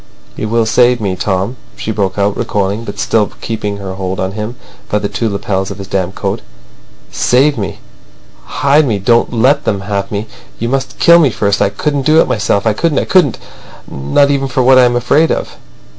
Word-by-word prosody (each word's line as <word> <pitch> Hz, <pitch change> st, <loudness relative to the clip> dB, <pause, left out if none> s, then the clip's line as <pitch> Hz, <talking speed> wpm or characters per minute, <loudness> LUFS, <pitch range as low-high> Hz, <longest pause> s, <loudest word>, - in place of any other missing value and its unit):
"You 110 Hz, -, -4 dB
will 115 Hz, 0 st, +2 dB
save 120 Hz, +2 st, +3 dB
me, 100 Hz, -4 st, -2 dB
Tom," 95 Hz, +5 st, -2 dB, 0.2 s
she -, -, -4 dB
broke 100 Hz, -3 st, -2 dB
out, 100 Hz, 0 st, +1 dB
recoiling, 105 Hz, +2 st, -2 dB
but 100 Hz, -, -7 dB
still 110 Hz, -2 st, +1 dB
keeping 105 Hz, -3 st, -4 dB
her 95 Hz, -2 st, -6 dB
hold 95 Hz, 0 st, -4 dB
on 95 Hz, 0 st, -2 dB
him 105 Hz, +3 st, -5 dB, 0.3 s
by 105 Hz, -, +1 dB
the 105 Hz, -, -2 dB
two 115 Hz, +2 st, -2 dB
lapels 95 Hz, -1 st, -2 dB
of 100 Hz, -, -7 dB
his 100 Hz, -, -7 dB
damp 95 Hz, -1 st, -2 dB
coat. -, -, -3 dB, 0.7 s
"Save 140 Hz, +4 st, +2 dB
me. 100 Hz, -4 st, -4 dB, 0.7 s
Hide 140 Hz, +1 st, +2 dB
me. 110 Hz, -4 st, 0 dB
Don't 115 Hz, +4 st, +2 dB
let 130 Hz, +5 st, +2 dB
them 100 Hz, -3 st, -1 dB
have 100 Hz, 0 st, -3 dB
me. 105 Hz, +1 st, -3 dB, 0.3 s
You 115 Hz, -, -3 dB
must 135 Hz, +1 st, -2 dB
kill 170 Hz, 0 st, +6 dB
me 150 Hz, -5 st, +4 dB
first. 100 Hz, -2 st, 0 dB
I -, -, +3 dB
couldn't 145 Hz, -2 st, -2 dB
do 155 Hz, +1 st, +5 dB
it -, -, +3 dB
myself—I 105 Hz, +1 st, 0 dB
couldn't, 155 Hz, +5 st, 0 dB
I -, -, +1 dB
couldn't—not 140 Hz, -, 0 dB
even 135 Hz, -1 st, 0 dB
for 130 Hz, 0 st, 0 dB
what 130 Hz, +1 st, +6 dB
I 125 Hz, -, +6 dB
am 120 Hz, 0 st, +1 dB
afraid 140 Hz, +7 st, +2 dB
of." -, -, -3 dB
110 Hz, 200 wpm, -14 LUFS, 100-130 Hz, 0.7 s, kill